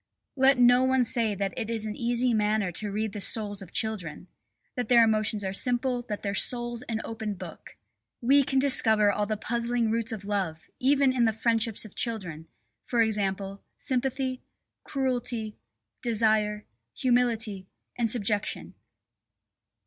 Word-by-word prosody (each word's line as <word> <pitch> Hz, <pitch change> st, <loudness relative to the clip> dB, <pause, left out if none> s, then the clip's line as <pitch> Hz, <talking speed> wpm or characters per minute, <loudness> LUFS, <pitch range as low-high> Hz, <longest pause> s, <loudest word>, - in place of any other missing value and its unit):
Let 265 Hz, -1 st, +4 dB
no 245 Hz, +1 st, +5 dB
one 260 Hz, -1 st, +3 dB
say 225 Hz, -3 st, +1 dB
that 195 Hz, -1 st, -3 dB
it 220 Hz, -, -4 dB
is 225 Hz, -2 st, -2 dB
an 210 Hz, -1 st, -4 dB
easy 240 Hz, +1 st, 0 dB
matter 210 Hz, -3 st, +1 dB
to 205 Hz, +4 st, -4 dB
read 215 Hz, 0 st, -3 dB
the 205 Hz, -, -6 dB
souls 205 Hz, 0 st, -3 dB
of 185 Hz, -3 st, -11 dB
children! 185 Hz, -8 st, -3 dB, 0.5 s
That 245 Hz, -3 st, -3 dB
their 235 Hz, -1 st, +6 dB
emotions 215 Hz, -1 st, +1 dB
are 190 Hz, 0 st, -3 dB
simple, 245 Hz, +3 st, 0 dB
that 210 Hz, -, -4 dB
their 200 Hz, -1 st, -2 dB
soul's 240 Hz, +2 st, 0 dB
an 225 Hz, -1 st, -2 dB
open 220 Hz, -2 st, -5 dB
book! -, -, -11 dB, 0.4 s
We 275 Hz, +4 st, +4 dB
can 270 Hz, 0 st, -1 dB
discover 220 Hz, -6 st, +6 dB
all 205 Hz, +1 st, -1 dB
the 215 Hz, 0 st, -2 dB
puzzling 235 Hz, +1 st, -1 dB
roots 230 Hz, 0 st, 0 dB
of 210 Hz, -3 st, -6 dB
love, 190 Hz, -6 st, -3 dB
even 275 Hz, 0 st, +3 dB
in 245 Hz, -2 st, +2 dB
the 225 Hz, -, +3 dB
friendships 225 Hz, 0 st, 0 dB
of 215 Hz, -, -12 dB
children, 180 Hz, -9 st, -4 dB, 0.4 s
e.g., 200 Hz, -4 st, 0 dB, 0.2 s
sympathy, 260 Hz, 0 st, -2 dB, 0.4 s
cruelty, 245 Hz, -5 st, -2 dB, 0.5 s
desire, 215 Hz, -2 st, +1 dB, 0.3 s
humility, 230 Hz, -6 st, +1 dB, 0.3 s
and 235 Hz, -2 st, 0 dB
subjection. 210 Hz, -2 st, -1 dB
225 Hz, 150 wpm, -27 LUFS, 210-245 Hz, 0.5 s, their